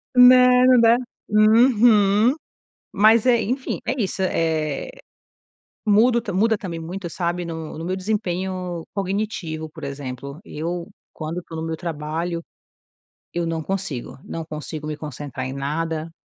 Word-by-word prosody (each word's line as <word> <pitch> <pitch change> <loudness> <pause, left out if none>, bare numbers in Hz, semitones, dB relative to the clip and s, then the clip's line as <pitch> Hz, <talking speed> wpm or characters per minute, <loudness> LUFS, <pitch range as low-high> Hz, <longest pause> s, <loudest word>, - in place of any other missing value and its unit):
Não, 250 0 +8
não 255 -2 +6
da 230 +1 +6 0.3
uhum. 215 0 +5 0.6
Mas 215 +3 +5
é, 240 -2 +5
enfim, 255 +6 -2
é 260 0 -1
isso, 190 -2 -1
eh, 160 -5 -1 1.0
muda 230 +3 +4
o - - -6
muda 220 +3 +3
também 175 -5 -5
muito, 175 +3 -6
sabe, 175 +1 -2
no 160 -2 -6
no 165 - -5
meu 185 +2 -2
desempenho 185 -3 -3
cognitivo, 190 -5 -3
por 155 -2 -9
exemplo, 140 +2 -6
eu 170 +3 -4 0.2
quando 165 +3 -5
tô 165 - -8
no 160 - -3
meu 160 0 -3
trabalho, 165 +1 -3 0.9
eu 170 -1 -1
não 165 -1 -2
consigo, 180 -10 -4
não 165 - -5
consigo 155 -1 -7
me 155 0 -3
concentrar 145 -3 -6
em 130 - -5
nada, 155 +4 -3
175 Hz, 140 wpm, -22 LUFS, 160-215 Hz, 1.0 s, Não